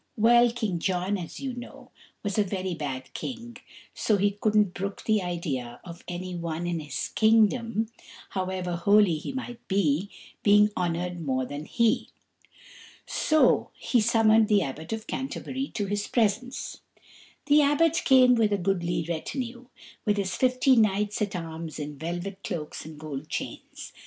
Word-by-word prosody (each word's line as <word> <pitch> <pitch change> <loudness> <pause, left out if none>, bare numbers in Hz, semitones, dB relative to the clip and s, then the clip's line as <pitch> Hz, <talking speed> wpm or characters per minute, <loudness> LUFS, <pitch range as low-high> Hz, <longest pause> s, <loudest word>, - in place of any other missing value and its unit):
Well, 240 +2 +5
King 220 -7 -2
John, 185 +3 0
as 175 -4 -6
you 270 -2 -4
know, 245 0 -10 0.3
was 205 0 -1
a - - +5
very 185 -2 -3
bad 135 -5 -5
king, 235 -2 -6 0.5
and 210 -2 +5
he 200 +1 +3
couldn't 210 -2 +2
brook 195 +1 -5
the 215 -2 +3
idea 150 -9 -4
of 170 -1 -10
any 180 +1 -5
one 170 0 -3
in 175 -1 -1
his 145 -4 -4
kingdom, 225 0 +3 0.5
however 185 -2 -2
holy 200 -2 +4
he - - -5
might 245 -3 -6
be, 190 -1 +1 0.3
being 210 0 +5
honoured 175 0 -2
more 130 -3 0
than 145 +3 -6
he. 230 +3 +1 1.0
So 310 -1 +3
he 245 - +1
summoned 225 -1 +4
the 205 -3 +4
Abbot 155 +5 -6
of 220 0 -4
Canterbury 265 +1 -4
to 205 - -1
his 205 +1 -2
presence. 235 +2 -1 0.6
The 295 +1 +6
Abbot 295 +3 +3
came 255 -1 +6
with 225 -3 +3
a 205 - +2
goodly 175 -3 -1
retinue, 240 - -4 0.4
with 210 -1 +1
his 190 -2 -1
fifty 255 +1 +3
knights 210 -1 +2
at 205 -1 -1
arms 165 -2 -6
in 150 -1 -6
velvet 175 +4 -5
cloaks 160 -8 -5
and 155 -1 -10
gold 150 -3 -6
chains. - - -6
200 Hz, 155 wpm, -27 LUFS, 170-230 Hz, 1.0 s, The